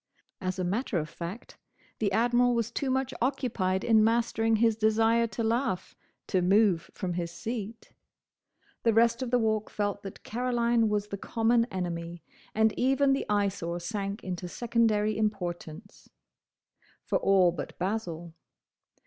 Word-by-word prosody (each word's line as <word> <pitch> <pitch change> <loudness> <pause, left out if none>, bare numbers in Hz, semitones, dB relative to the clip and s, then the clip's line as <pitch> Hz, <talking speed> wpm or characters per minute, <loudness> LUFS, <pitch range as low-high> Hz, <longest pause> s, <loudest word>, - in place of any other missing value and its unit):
As 185 0 -2
a 185 - -1
matter 200 +3 -1
of 155 -2 -2
fact 170 +8 -8 0.4
the 205 -3 +1
Admiral 240 +3 +3
was 230 0 -1
too 270 +3 -2
much 265 0 0
occupied 230 -8 0
in 220 -2 +5
mastering 225 0 +2
his 225 0 +3
desire 225 +1 +3
to 230 +1 -4
laugh, 225 -4 -1 0.3
to 185 - +1
move 190 -2 +3
from 180 -3 -3
his 170 -1 -3
seat. 225 +4 -6 0.9
The 230 -2 +2
rest 235 +2 +4
of 255 - -2
the 245 - +3
Walk 220 -2 0
felt 205 -1 -2
that 195 -1 -9
Caroline 235 -1 +1
was 210 0 -1
the 200 - -5
common 230 +2 +2
enemy, 175 -5 -5 0.3
and 220 0 +3
even 270 +2 +3
the 270 - -2
Eyesore 195 -4 0
sank 200 +3 -4
into 180 -1 -4
secondary 220 0 +1
importance. 195 -3 -4 1.0
For - - +1
all 190 -3 +4
but 175 - -7
Basil. 175 -4 -3
215 Hz, 145 wpm, -28 LUFS, 185-235 Hz, 1.0 s, in